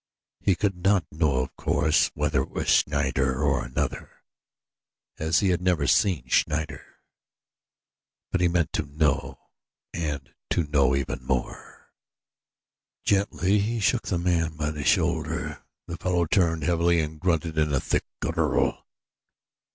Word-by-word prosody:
He 95 - +2
could 95 0 -1
not 95 -4 +3
know, 75 -3 +1
of - - -9
course, 80 0 +2
whether 75 -2 +1
it - - -5
was - - -4
Schneider 65 -1 +2
or 70 -2 +1
another, - - -3 1.1
as 80 +1 +2
he 100 - +2
had 90 -1 +1
never 90 -5 +1
seen 75 -3 +2
Schneider; 75 +2 0 1.5
but 90 - 0
he 90 - +4
meant 85 -2 0
to 70 - -2
know 75 -1 0 0.6
and 75 -5 -4 0.2
to 85 - +1
know 70 -3 +2
even 65 -1 -3
more. 65 -1 -4 1.1
Gently 100 0 +2
he 115 +3 -1
shook 115 +3 +1
the 90 - 0
man 85 -3 0
by 75 0 -1
the 75 -2 -5
shoulder. 60 - 0 0.2
The 85 - -6
fellow 90 -2 0
turned 80 -2 +1
heavily 85 +1 +2
and 75 0 -3
grunted 80 -2 0
in 75 -1 +1
a 70 - +2
thick - - -1
guttural. - - 0
80 Hz, 140 wpm, -26 LUFS, 75-90 Hz, 1.5 s, he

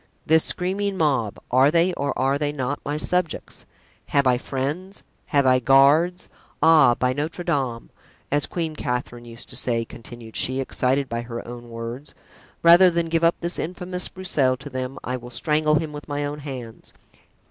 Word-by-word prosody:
This 160 0 +4
screaming 195 +2 -2
mob, 135 - +1
are 130 +3 +5
they, 170 +3 +2
or 140 -4 -2
are 135 +2 +1
they 145 -1 0
not, 140 -1 -3
my 145 +1 -2
subjects? 180 +1 -2 0.4
Have 140 -1 +2
I 125 -1 +3
friends? 150 +11 -4 0.2
Have 140 -2 +2
I 130 0 +5
guards? 140 +8 +4 0.3
Ah! 155 -6 +6
by 125 +1 0
Notre 155 +5 -4
Dame! 135 -9 -2 0.4
as 145 +1 +1
Queen 165 -3 -3
Catherine 125 -3 -4
used 115 0 -11
to - - -6
say," 115 -2 0
continued 115 0 -12
she, 130 +1 +1
excited 135 +1 0
by 115 -1 -3
her 120 0 -7
own 120 0 -9
words, 115 +5 -7 0.5
"rather 175 +2 +8
than 170 -1 -1
give 165 0 +1
up 165 +1 +4
this 170 +1 -2
infamous 180 +2 -3
Broussel 145 -9 0
to 140 +2 -10
them 130 +1 -4
I 130 +1 -2
will 120 0 -10
strangle 150 +4 +1
him 155 0 -1
with 150 0 -8
my 145 -1 -2
own 145 +1 -5
hands!" 130 -6 -9
140 Hz, 175 wpm, -23 LUFS, 125-165 Hz, 0.5 s, rather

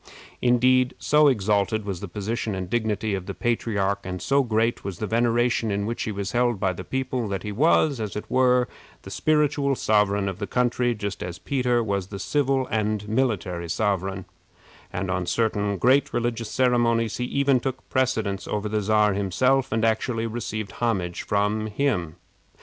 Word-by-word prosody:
Indeed, 125 +1 +3
so 150 0 +4
exalted 105 -3 +1
was 95 -4 -4
the 100 - -6
position 105 +3 -3
and 95 -1 -4
dignity 110 -1 -1
of 95 -2 -4
the 100 - -5
patriarch, 100 -4 -1
and 90 0 -5
so 140 +7 +2
great 115 -1 0
was 95 -3 -5
the 110 - -3
veneration 115 +1 +1
in 100 0 -1
which 115 +2 -3
he 110 - -2
was 100 -1 -4
held 120 -3 +1
by 95 -1 +1
the 90 - -7
people, 130 +1 -2
that 100 -1 -3
he 105 - -4
was, 145 +3 +3
as 105 -2 -4
it 105 - -4
were, 125 -1 +3 0.4
the - - -9
spiritual 150 -2 +1
sovereign 105 -3 +2
of 95 -1 -4
the 105 - -3
country, 120 -1 +1
just 100 -2 -5
as 90 0 -5
Peter 125 +4 0
was 100 -3 -2
the 100 - -7
civil 135 +3 0
and 105 -1 -1
military 100 -8 -1
sovereign; 95 -1 -1 0.7
and 90 0 -3
on 90 -1 -2
certain 105 -3 0
great 130 +8 +3
religious 120 -2 -2
ceremonies 120 -3 +2
he 125 - -2
even 140 0 +2
took 130 +1 -5
precedence 110 -7 -1
of 105 0 -2
the 110 -1 0
Czar 105 0 +3
himself, 125 +8 +1
and 110 0 +1
actually 115 +1 0
received 110 -3 -4
homage 95 -7 -1
from 105 +1 0
him. 105 - -1
110 Hz, 175 wpm, -24 LUFS, 100-125 Hz, 0.7 s, so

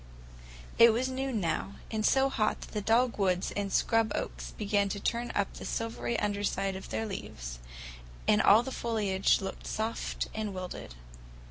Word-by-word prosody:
It 230 -1 +9
was 255 +3 0
noon 260 -3 -2
now, 190 +2 -1 0.2
and 220 -1 -1
so 270 +4 +4
hot 215 -5 0
that - - -9
the 210 - -2
dogwoods 210 -5 +2
and 200 -1 -2
scrub 225 0 +2
oaks - - -4
began 205 -1 0
to 200 - -3
turn 235 +4 -1
up 200 -1 0
the - - -9
silvery 230 +1 -2
under 205 -1 -1
side 195 -1 0
of 190 - -8
their 225 - -2
leaves, - - -6 0.7
and 105 - +5
all 215 +4 +7
the 265 - -5
foliage 210 -7 +1
looked 195 - -6
soft 220 +1 -2
and 215 -3 -3
wilted. 180 - -6
210 Hz, 165 wpm, -30 LUFS, 195-230 Hz, 0.7 s, It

